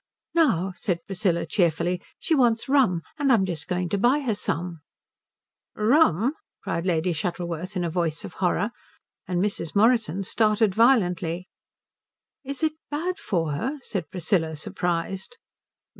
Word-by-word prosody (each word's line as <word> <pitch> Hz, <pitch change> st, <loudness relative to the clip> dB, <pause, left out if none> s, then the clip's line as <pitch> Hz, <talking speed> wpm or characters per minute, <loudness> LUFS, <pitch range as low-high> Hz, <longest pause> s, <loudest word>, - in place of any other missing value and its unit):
"Now," 195 Hz, -, +2 dB
said 170 Hz, -5 st, -2 dB
Priscilla 180 Hz, -3 st, 0 dB
cheerfully, 175 Hz, 0 st, +1 dB, 0.2 s
"she 330 Hz, -, -1 dB
wants 240 Hz, -5 st, +3 dB
rum, 250 Hz, -, +3 dB, 0.2 s
and 280 Hz, -2 st, +3 dB
I'm 215 Hz, -6 st, +4 dB
just 165 Hz, -5 st, -3 dB
going 180 Hz, 0 st, -1 dB
to 200 Hz, -, 0 dB
buy 255 Hz, +7 st, +3 dB
her 250 Hz, -6 st, 0 dB
some." 175 Hz, -4 st, -2 dB, 1.0 s
"Rum?" 230 Hz, -, +3 dB, 0.3 s
cried 170 Hz, +2 st, -2 dB
Lady 170 Hz, 0 st, +1 dB
Shuttleworth 175 Hz, +2 st, -4 dB
in 180 Hz, -, 0 dB
a 170 Hz, -, -1 dB
voice 165 Hz, -2 st, -1 dB
of -, -, -9 dB
horror; 200 Hz, +4 st, +1 dB, 0.6 s
and 180 Hz, -2 st, -1 dB
Mrs. 195 Hz, -4 st, -2 dB
Morrison 215 Hz, -4 st, +3 dB
started 215 Hz, 0 st, +2 dB
violently. 180 Hz, -7 st, +2 dB, 1.0 s
"Is 275 Hz, +2 st, -5 dB
it 315 Hz, -1 st, +2 dB, 0.2 s
bad 355 Hz, +6 st, -2 dB
for 165 Hz, -, -1 dB
her?" 260 Hz, -, -2 dB
said 180 Hz, -8 st, -4 dB
Priscilla, 165 Hz, -3 st, 0 dB
surprised. 175 Hz, -, -3 dB
185 Hz, 140 wpm, -25 LUFS, 170-230 Hz, 1.0 s, I'm